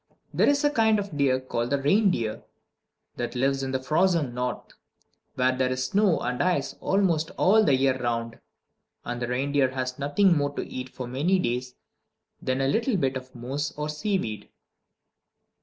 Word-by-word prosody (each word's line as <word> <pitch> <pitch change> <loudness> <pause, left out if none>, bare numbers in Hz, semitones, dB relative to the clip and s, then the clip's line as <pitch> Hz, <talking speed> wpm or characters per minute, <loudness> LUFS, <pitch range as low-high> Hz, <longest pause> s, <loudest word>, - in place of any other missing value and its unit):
There - - +3
is 285 +1 +2
a 290 - +3
kind 220 -4 +3
of 200 -5 -4
deer, 135 -3 +2
called 120 -2 -3
the 140 - +1
reindeer, 140 - +1 0.8
that 120 0 -4
lives 135 +2 +1
in 135 - -3
the 130 - 0
frozen 155 -1 +1
North, 125 0 -4 0.6
where 130 0 +2
there 130 0 0
is 130 0 -1
snow 195 +2 +2
and 125 +1 -2
ice 175 -6 0
almost 175 -5 +1
all 215 +4 +5
the 140 - +4
year 130 -1 +1
round; 115 -1 -2 0.7
and 120 0 -4
the 120 - -1
reindeer 135 +2 +1
has 130 0 -4
nothing 170 +6 +3
more 145 -1 -1
to - - -3
eat 130 0 -6
for 125 - -7
many 145 +10 +1
days 125 -5 -2 0.7
than 130 +1 -1
a 135 - +2
little 230 - +1
bit 135 -5 0
of 130 0 -8
moss 135 +5 -4
or 150 0 -3
seaweed. 150 - -3
135 Hz, 175 wpm, -26 LUFS, 125-175 Hz, 0.8 s, all